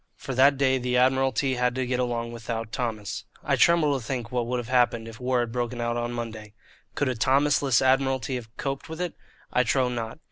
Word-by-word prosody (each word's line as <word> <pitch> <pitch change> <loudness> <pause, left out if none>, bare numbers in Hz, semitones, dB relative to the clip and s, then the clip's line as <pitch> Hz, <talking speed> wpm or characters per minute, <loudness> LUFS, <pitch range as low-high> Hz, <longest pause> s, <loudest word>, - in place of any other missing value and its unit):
For 135 - -6
that 135 +2 +5
day 130 -1 +2
the 125 0 0
Admiralty 130 0 +2
had 125 0 0
to 130 0 -1
get 125 0 -1
along 120 -1 -1
without 115 -1 -5
Thomas. 110 -5 -3 0.2
I - - +2
tremble 160 -4 +4
to - - -10
think 120 -1 -4
what 120 -2 -1
would 125 +1 -1
have 120 -2 -4
happened 120 -2 +2
if 115 +2 -10
war 125 -1 +1
had 120 -1 -3
broken 120 0 -3
out 120 0 -1
on 120 0 -2
Monday. 110 -3 -6 0.4
Could 145 - 0
a - - 0
Thomasless 135 +1 +3
Admiralty 130 -2 +2
have 120 -3 -5
coped 135 +2 -4
with 160 +1 -7
it? 180 -2 -2 0.4
I 125 - +4
trow 125 +1 +2
not. 115 -2 -4
125 Hz, 215 wpm, -26 LUFS, 120-130 Hz, 0.4 s, that